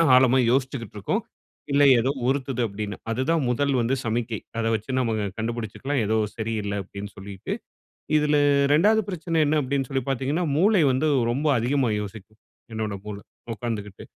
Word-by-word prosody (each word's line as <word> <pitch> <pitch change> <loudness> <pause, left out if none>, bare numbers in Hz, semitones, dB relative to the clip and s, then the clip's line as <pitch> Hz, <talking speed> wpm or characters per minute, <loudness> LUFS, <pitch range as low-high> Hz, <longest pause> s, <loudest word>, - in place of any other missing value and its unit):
ஆழமா 130 0 +5
யோசிச்சுக்கிட்டுருக்கோம். 125 -6 -1 0.5
இல்ல 140 +1 +4 0.2
ஏதோ 130 +4 +1 0.2
உறுத்துது 135 -2 0
அப்படின்னு. 105 0 -5 0.2
அதுதான் 130 +8 +1
முதல் 140 +3 +1
வந்து 120 +3 +1
சமிக்கை. 115 -1 -1 0.2
அத 115 - 0
வச்சு 110 +4 -6
நம்ம 115 -3 0
க 105 - -1
கண்டுபிடிச்சுக்கலாம், 115 +4 -2
ஏதோ 110 +2 +1 0.2
சரி 115 0 -3
இல்ல 100 - -3
அப்பிடின்னு 100 +2 -8
சொல்லிட்டு. 95 -1 -6 0.6
இதில 150 0 +2 0.4
2வது 210 +8 +4
பிரச்சனை 165 -2 -2
என்ன 150 +1 +2
அப்பிடின்னு 135 -1 -1
சொல்லி 135 -2 -1
பார்த்தீங்கன்னா, 135 +6 0
மூளை 195 +3 +4
வந்து 130 +5 +1 0.2
ரொம்ப 145 +5 -1
அதிகமா 125 +2 +1
யோசிக்கும். 110 +1 -10 0.3
என்னோட 110 -2 -2
மூளை. 100 -1 -6 0.3
உட்காந்துக்கிட்டு. 105 -4 -5
125 Hz, 150 wpm, -25 LUFS, 110-140 Hz, 0.6 s, ஆழமா